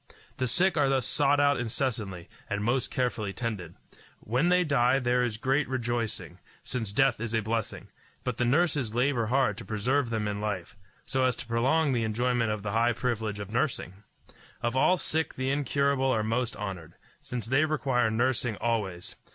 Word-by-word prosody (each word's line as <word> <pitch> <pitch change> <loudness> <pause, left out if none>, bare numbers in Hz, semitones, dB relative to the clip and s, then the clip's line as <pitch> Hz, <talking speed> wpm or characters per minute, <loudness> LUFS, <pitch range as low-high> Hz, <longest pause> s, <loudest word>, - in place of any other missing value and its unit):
The 130 - 0
sick 180 +7 +3
are 140 -2 +3
thus 135 -3 +1
sought 145 0 +2
out 145 -1 +3
incessantly, 110 -7 -2 0.2
and 100 0 -1
most 120 +3 +1
carefully 115 -5 -1
tended. 100 -9 -4 0.4
When 125 +10 +1
they 180 0 +4
die 135 -4 +3
there 125 -1 +2
is 120 -3 -1
great 135 +3 +1
rejoicing, 120 -3 -3 0.2
since 115 -6 -3
death 135 +6 +3
is 115 0 -3
a 110 - +1
blessing; 110 +1 -3 0.4
but 125 -2 -2
the - - +1
nurses 135 -3 +1
labor 125 -2 +1
hard 125 -4 +1
to - - -7
preserve 125 +5 0
them 110 -2 -1
in 105 0 -3
life, 105 -4 -3 0.3
so 130 -1 0
as 125 -2 +2
to - - -7
prolong 135 +6 +2
the 120 -2 +1
enjoyment 120 +1 +1
of 105 -1 -2
the 100 - -2
high 115 +2 +3
privilege 115 -3 -2
of 100 0 -6
nursing. 120 -6 -1 0.7
Of 120 +1 0
all 180 +8 +4
sick 160 -1 -1
the 130 +1 -1
incurable 140 -1 +1
are 110 -3 +1
most 120 +3 -1
honored, 95 -6 -6 0.2
since 120 -4 -5
they 135 +6 +3
require 135 -7 +1
nursing 120 0 0
always. 105 -6 -2
120 Hz, 180 wpm, -28 LUFS, 110-135 Hz, 0.7 s, they